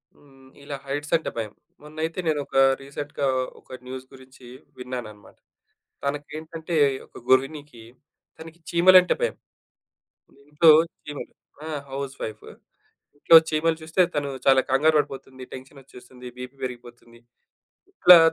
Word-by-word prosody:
హ్మ్. 135 -2 -21
ఇలా 140 0 -6
హైట్స్ 145 +3 -4
అంటే 160 - -5
భయం. 110 -2 -4 0.3
మొన్నైతే 155 +3 -5
నేనొక 145 -3 -1 0.2
రీసెంట్‌గా 140 +1 -5 0.3
ఒక 130 - -11
న్యూస్ 130 0 -7
గురించి 130 -1 -16 0.3
విన్నానన్నమాట. 125 -5 -8 0.7
తనకేంటంటే, 155 +3 -5 0.3
ఒక - - -16
గృహిణికి 135 -1 0 0.5
తనకి 165 +1 -12
చీమలంటే 180 +1 +6
భయం. 485 - 0 1.1
ఇంట్లో 155 +2 +5 0.3
చీమలు 150 -1 -8 0.3
ఆ! - - -6 0.2
House 135 0 -5
wife. 110 -1 -6 0.7
ఇంట్లో 165 +3 +8
చీమలు 160 +1 +1
చూస్తే, 160 +4 0
తను 145 -1 -1 0.2
చాలా 135 -1 +6
కంగారు 155 +4 +3
పడిపోతుంది, 135 -2 -6
టెన్షనోచ్చేస్తుంది, 130 -2 -12
బీపీ 125 +2 -8
పెరిగిపోతుంది. 120 -1 -11 0.7
ఇట్లా 180 - +8
140 Hz, 110 wpm, -24 LUFS, 130-155 Hz, 1.1 s, ఇంట్లో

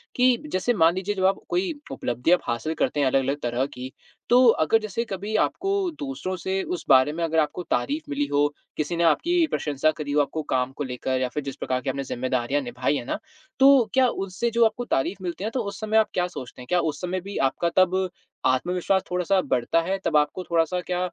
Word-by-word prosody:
कि 250 0 +4 0.2
जैसे 240 +6 +1
मान 165 -3 +4
लीजिए 195 +2 -2
जब 190 -1 0
आप 195 +1 +2
कोई 360 -1 0 0.2
उपलब्धि 125 +7 -1
आप 180 - +6
हासिल 120 +7 -2
करते 150 - -1
हैं 140 - +3
अलग-अलग 135 +2 +1
तरह 120 +2 0
की 130 -1 -8 0.4
तो 250 +1 +6 0.2
अगर 225 +8 +3
जैसे 215 +2 -3
कभी 205 +1 -4
आपको 390 +2 -4 0.3
दूसरों 270 -10 -4
से 190 +2 -2
उस 180 - -4
बारे 130 +2 +6
में 170 +1 -3
अगर 160 0 +1
आपको 155 +3 -1
तारीफ़ 145 +2 -1
मिली 145 0 0
हो 145 +1 +2 0.3
किसी 155 +3 -1
ने 170 - +2
आपकी 335 - +3
प्रशंसा 150 +1 +1
करी 145 -2 -4
हो 150 - +4
आपको 155 +2 -2
काम 130 0 +1
को 145 - -5
लेकर 130 0 -2
या 130 - +1
फ़िर 150 +3 -4
जिस 135 -1 -5
प्रकार 130 0 -2
की - - -3
आपने 135 +1 -2
ज़िम्मेदारियाँ 130 +2 -1
निभाई 125 +2 -1
हैं 120 - -4
ना - - -2 0.4
तो 270 -4 +6
क्या 260 -1 +5
उससे 195 +1 -2
जो 230 0 +4
आपको 225 +2 -1
तारीफ़ 185 - -1
मिलती 175 +2 -4
है - - -1
ना - - -3
तो, 255 - -1
उस 200 -1 -6
समय 215 0 +1
आप 220 - +4
क्या 180 -1 +1
सोचते 130 -7 -9
हैं? 125 - -11
क्या 180 - +2
उस 155 -3 -2
समय 180 +1 -2
भी 200 +2 -7
आपका 135 +5 +1
तब 185 0 +3 0.4
आत्मविश्वास 180 +8 +1
थोड़ा-सा 180 +2 +1
बढ़ता 130 +6 +1
है, 190 +3 -1
तब 155 -2 +3
आपको 150 +5 0
थोड़ा-सा 170 +1 +1
क्या 180 +1 -3
170 Hz, 225 wpm, -25 LUFS, 140-195 Hz, 0.4 s, आप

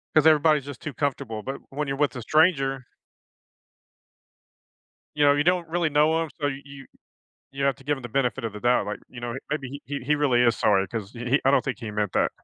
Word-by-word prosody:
'Cause 155 -1 +5
everybody's 155 -2 +4
just 145 -3 -9
too 155 - -5
comfortable, 130 -7 -3
but 135 +4 -4
when 145 +2 -3
you're 135 0 -2
with 145 -2 +1
a 125 - -5
stranger 135 -3 +2 2.3
you 145 -1 +3
know, 140 - +6
you 145 +1 +1
don't 175 0 +1
really 170 -1 0
know 155 +3 +3
him, 160 - -7
so 145 - 0
you 135 0 -4
you 140 -1 -11 0.7
you 140 0 -2
have 140 -2 +2
to 135 - -18
give 145 +1 0
him - - -11
the 120 - -6
benefit 130 0 -1
of 115 - -3
the 105 - -8
doubt, 120 +1 +2
like, 105 - -4
you 120 - -10
know, 120 0 -4
he 135 - -5
maybe 140 -2 -4
he 140 0 -4
he 150 +3 +2
really 130 -5 +3
is 120 -2 +3
sorry, 100 -2 +2
'cause 110 -2 -5
he 120 - -10
he 140 - +4
I 135 - +5
don't 140 - +3
think 130 -6 -3
he 115 -3 -6
meant 105 -2 -2
that. - - +2
135 Hz, 240 wpm, -25 LUFS, 120-150 Hz, 2.3 s, know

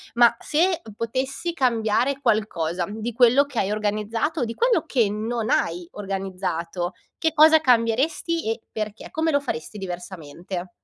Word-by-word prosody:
Ma 235 0 +6
se 345 +3 +1 0.2
potessi 260 +8 -2
cambiare 245 -1 +1
qualcosa 180 - 0
di 220 +3 -4
quello 250 +4 +5
che 270 -5 -4
hai 195 - 0
organizzato 215 +8 -1
o - - +2
di 230 - -4
quello 475 - +2
che 240 -9 +2
non 220 +2 -2
hai 170 +1 0
organizzato, 185 -3 -3 0.3
che 320 - +1
cosa 315 0 +7
cambieresti 260 +6 +1
e 225 0 -4
perché? 215 0 -5
Come 320 0 0
lo 285 - +3
faresti 210 - -5
diversamente? 180 -1 -6
225 Hz, 145 wpm, -24 LUFS, 195-275 Hz, 0.3 s, cosa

